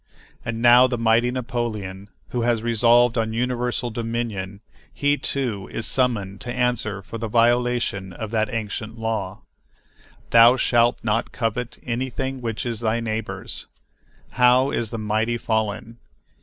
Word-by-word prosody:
And 115 Hz, 0 st, -4 dB
now 120 Hz, +1 st, +7 dB
the 125 Hz, -1 st, -2 dB
mighty 115 Hz, +1 st, +3 dB
Napoleon, 110 Hz, -6 st, -4 dB, 0.2 s
who 120 Hz, -, -2 dB
has 115 Hz, -1 st, +1 dB
resolved 120 Hz, +1 st, +4 dB
on 110 Hz, 0 st, -1 dB
universal 120 Hz, 0 st, -1 dB
dominion, 110 Hz, -4 st, -4 dB, 0.3 s
he, 145 Hz, 0 st, +1 dB
too, 120 Hz, -10 st, -3 dB
is 115 Hz, -, -3 dB
summoned 115 Hz, -7 st, 0 dB
to 125 Hz, -3 st, -4 dB
answer 120 Hz, -5 st, -1 dB
for 115 Hz, -, -7 dB
the 115 Hz, -, -3 dB
violation 120 Hz, -4 st, +1 dB
of 110 Hz, +4 st, -6 dB
that 110 Hz, +1 st, 0 dB
ancient 110 Hz, 0 st, -4 dB
law, 110 Hz, -3 st, -3 dB, 0.9 s
"Thou 120 Hz, +2 st, +7 dB
shalt 120 Hz, -1 st, +3 dB
not 115 Hz, 0 st, 0 dB
covet 120 Hz, +1 st, -3 dB
anything 130 Hz, +2 st, -3 dB
which 115 Hz, -1 st, -3 dB
is 115 Hz, -3 st, -2 dB
thy 115 Hz, 0 st, 0 dB
neighbor's." 110 Hz, -1 st, -4 dB, 0.6 s
How 125 Hz, +2 st, +4 dB
is 115 Hz, -2 st, -1 dB
the 115 Hz, -, -5 dB
mighty 110 Hz, +2 st, 0 dB
fallen! 110 Hz, 0 st, -2 dB
115 Hz, 140 wpm, -23 LUFS, 110-120 Hz, 0.9 s, now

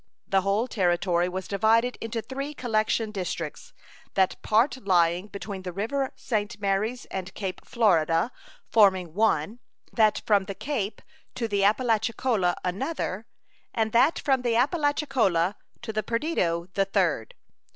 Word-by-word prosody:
The 195 Hz, 0 st, +3 dB
whole 200 Hz, +5 st, +1 dB
Territory 175 Hz, -4 st, +1 dB
was 185 Hz, +1 st, -5 dB
divided 225 Hz, +4 st, +2 dB
into 225 Hz, 0 st, -3 dB
three 275 Hz, +3 st, -5 dB
collection 220 Hz, -2 st, 0 dB
districts, 200 Hz, -, -5 dB, 0.4 s
that 190 Hz, -1 st, +1 dB
part 240 Hz, +4 st, +2 dB
lying 180 Hz, -4 st, +2 dB
between 200 Hz, -1 st, -6 dB
the 185 Hz, -1 st, -5 dB
river 255 Hz, +9 st, -2 dB
St. 210 Hz, -3 st, -3 dB
Marys 205 Hz, +5 st, -1 dB
and 190 Hz, 0 st, -4 dB
Cape 190 Hz, -2 st, -5 dB
Florida 175 Hz, -4 st, +2 dB, 0.4 s
forming 190 Hz, -6 st, +4 dB
one, 210 Hz, +1 st, +1 dB, 0.3 s
that 215 Hz, -2 st, +3 dB
from 205 Hz, -3 st, +3 dB
the 195 Hz, 0 st, -6 dB
Cape 230 Hz, -7 st, -3 dB, 0.3 s
to 230 Hz, -, -2 dB
the 200 Hz, -2 st, 0 dB
Apalachicola 220 Hz, -3 st, +2 dB
another, 200 Hz, -, -3 dB, 0.5 s
and 220 Hz, -1 st, +1 dB
that 255 Hz, +8 st, +4 dB
from 265 Hz, -3 st, +1 dB
the 240 Hz, -2 st, 0 dB
Apalachicola 255 Hz, -, +1 dB, 0.3 s
to 225 Hz, -2 st, -4 dB
the 215 Hz, -, 0 dB
Perdido 210 Hz, -, -1 dB
the 195 Hz, -, +2 dB
third. 185 Hz, -, 0 dB
210 Hz, 135 wpm, -26 LUFS, 190-235 Hz, 0.5 s, forming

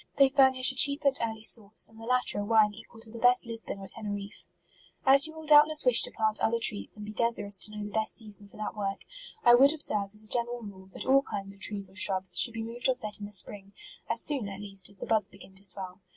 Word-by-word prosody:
They 275 Hz, -1 st, +5 dB
furnish 265 Hz, -1 st, +3 dB
a -, -, -13 dB
cheap 280 Hz, +1 st, +5 dB
and 275 Hz, -1 st, +3 dB
early 220 Hz, -1 st, -5 dB
sauce, 220 Hz, -2 st, +3 dB
and 225 Hz, 0 st, -18 dB
the -, -, -9 dB
latter 250 Hz, -3 st, 0 dB
a -, -, -3 dB
wine 215 Hz, -1 st, +2 dB
equal 225 Hz, +2 st, -15 dB
to 225 Hz, -1 st, -10 dB
the 230 Hz, -, -10 dB
best 245 Hz, +1 st, +3 dB
Lisbon 230 Hz, -3 st, -7 dB
or 195 Hz, 0 st, -10 dB
Teneriffe. 205 Hz, -1 st, -8 dB, 0.6 s
As 275 Hz, +3 st, +6 dB
you 315 Hz, -, -12 dB
will 315 Hz, 0 st, -11 dB
doubtless 300 Hz, 0 st, +5 dB
wish 250 Hz, -2 st, +7 dB
to -, -, +7 dB
plant 220 Hz, -1 st, -2 dB
other 230 Hz, +1 st, 0 dB
trees, 215 Hz, -1 st, -2 dB
and 210 Hz, -, -9 dB
be 210 Hz, -, -9 dB
desirous 215 Hz, -3 st, -1 dB
to 210 Hz, -, +1 dB
know 210 Hz, -1 st, -7 dB
the 205 Hz, -, -9 dB
best 220 Hz, +1 st, -1 dB
sea 220 Hz, -3 st, -7 dB
son 205 Hz, 0 st, +2 dB
for 200 Hz, -, -19 dB
that 215 Hz, 0 st, -6 dB
work, 195 Hz, -2 st, -4 dB, 0.4 s
I 240 Hz, -, +6 dB
would 275 Hz, +5 st, +6 dB
observe 210 Hz, -9 st, -3 dB
as 210 Hz, +1 st, -13 dB
a -, -, -8 dB
gen 235 Hz, +1 st, +3 dB
eral 240 Hz, 0 st, -7 dB
rule, 190 Hz, -1 st, -14 dB
that -, -, -6 dB
all 270 Hz, +1 st, +4 dB
kind 200 Hz, -6 st, -7 dB
of 200 Hz, -, -20 dB
trees 200 Hz, 0 st, -1 dB
or 190 Hz, -, -20 dB
shrubs, 190 Hz, 0 st, 0 dB
should 235 Hz, -, +1 dB
be 225 Hz, -, -5 dB
moved 240 Hz, +3 st, -4 dB
or 260 Hz, -, +1 dB
set 215 Hz, -5 st, -3 dB
in 205 Hz, -, -7 dB
the -, -, -15 dB
spring, 200 Hz, 0 st, -3 dB, 0.4 s
as -, -, +2 dB
soon, 270 Hz, -9 st, -3 dB
at 195 Hz, 0 st, -9 dB
least, 195 Hz, -2 st, -7 dB
as 200 Hz, -, -10 dB
the -, -, -8 dB
buds 215 Hz, -3 st, 0 dB
begin 195 Hz, 0 st, -17 dB
to 195 Hz, +1 st, -8 dB
swell. 190 Hz, -1 st, -3 dB
215 Hz, 270 wpm, -28 LUFS, 200-245 Hz, 0.6 s, wish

